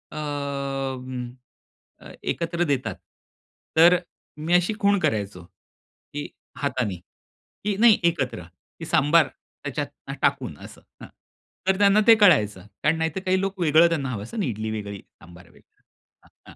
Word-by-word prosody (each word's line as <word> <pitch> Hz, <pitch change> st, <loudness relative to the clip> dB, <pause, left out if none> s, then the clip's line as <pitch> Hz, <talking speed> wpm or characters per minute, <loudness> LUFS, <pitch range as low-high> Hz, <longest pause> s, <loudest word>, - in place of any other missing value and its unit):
अं, 135 Hz, -4 st, -4 dB, 0.7 s
अ, -, -, -12 dB, 0.2 s
एकत्र 170 Hz, +1 st, -2 dB
देतात. 130 Hz, -, -1 dB, 0.8 s
तर 170 Hz, +2 st, +7 dB, 0.4 s
मी 155 Hz, +3 st, -2 dB
अशी 180 Hz, +4 st, +3 dB
खूण 200 Hz, -2 st, +3 dB
करायचो, 100 Hz, -, -2 dB
की 145 Hz, +10 st, -12 dB, 0.3 s
हाताने 125 Hz, -8 st, -1 dB, 0.7 s
की 210 Hz, -1 st, 0 dB
नाही 225 Hz, -2 st, +7 dB
एकत्र 140 Hz, -, 0 dB, 0.4 s
सांबार 155 Hz, +3 st, +4 dB, 0.4 s
त्याच्यात -, -, -3 dB, 0.3 s
टाकून -, -, 0 dB
असं -, -, -12 dB, 0.2 s
हं. -, -, -9 dB, 0.6 s
तर 190 Hz, 0 st, +3 dB
त्यांना 200 Hz, +1 st, +5 dB
ते 230 Hz, -, +9 dB
कळायचं, 105 Hz, -, +4 dB, 0.2 s
कारण 155 Hz, +2 st, +3 dB
नाहीतर 160 Hz, +2 st, -1 dB
काही 185 Hz, 0 st, +2 dB
लोकं 170 Hz, -4 st, +3 dB
त्यांना 140 Hz, -6 st, -1 dB
हवं 105 Hz, -5 st, -4 dB
असतं 115 Hz, -, -9 dB
आणि 205 Hz, -, 0 dB
इडली 110 Hz, -2 st, -3 dB
वेगळी, 100 Hz, -2 st, -5 dB, 0.2 s
सांबार 85 Hz, 0 st, -15 dB
वेगळा. -, -, -25 dB, 0.5 s
हं, -, -, -19 dB
हं. -, -, -17 dB
145 Hz, 135 wpm, -24 LUFS, 120-175 Hz, 0.8 s, ते